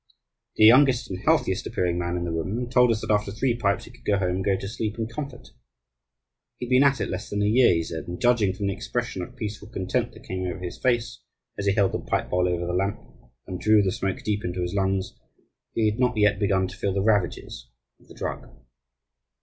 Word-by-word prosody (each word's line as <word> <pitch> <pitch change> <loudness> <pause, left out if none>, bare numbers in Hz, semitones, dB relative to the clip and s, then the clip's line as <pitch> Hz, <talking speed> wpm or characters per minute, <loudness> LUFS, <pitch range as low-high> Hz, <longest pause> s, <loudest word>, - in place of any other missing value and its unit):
The 110 - +6
youngest 125 -1 +5
and 90 - -4
healthiest - - +2
appearing 90 -1 -1
man 85 0 -2
in 85 - -2
the 85 - -3
room 95 +10 -2
told 125 -1 +5
us 110 -2 +1
that - - -2
after 105 -1 0
three 120 +3 0
pipes 110 -1 0
he - - -13
could 125 - -19
go 100 - +2
home 90 -1 0
and 95 - -2
go 100 -1 +2
to 100 - -6
sleep 110 +1 -3
in 115 - -1
comfort. 125 +2 -7 1.1
He 125 - -5
had 125 - -9
been 125 +1 +6
at 140 -1 +3
it - - -2
less 95 +3 -5
than 105 0 -1
a - - +2
year, 120 +4 +5
he 85 - 0
said; 80 -1 -6
and, 90 0 -6
judging 120 -5 +3
from 100 +1 -4
the 100 - 0
expression 95 - -3
of 120 +8 -8
peaceful 105 -3 -6
content 120 +3 -1
that 110 +2 -14
came 95 -7 -4
over 90 - -4
his 90 -1 -7
face 120 -2 0 0.4
as 100 - -3
he 100 - +4
held 100 -2 +2
the - - -2
pipe - - -2
bowl 90 0 +2
over 90 0 -1
the 90 - -3
lamp 95 +3 0 0.5
and 90 -1 -6
drew 110 -1 +4
the 95 - +1
smoke 95 -1 -3
deep 105 0 -1
into 90 0 -2
his 90 - -3
lungs, 95 -1 0 0.6
he 110 -2 +3
had 110 - -7
not 125 -2 +2
yet 105 -1 +3
begun 95 -2 +2
to 95 +1 -10
feel 100 0 -1
the 100 - +1
ravages 90 - -1 0.3
of - - -24
the - - -14
drug. - - -5
100 Hz, 240 wpm, -25 LUFS, 95-115 Hz, 1.1 s, The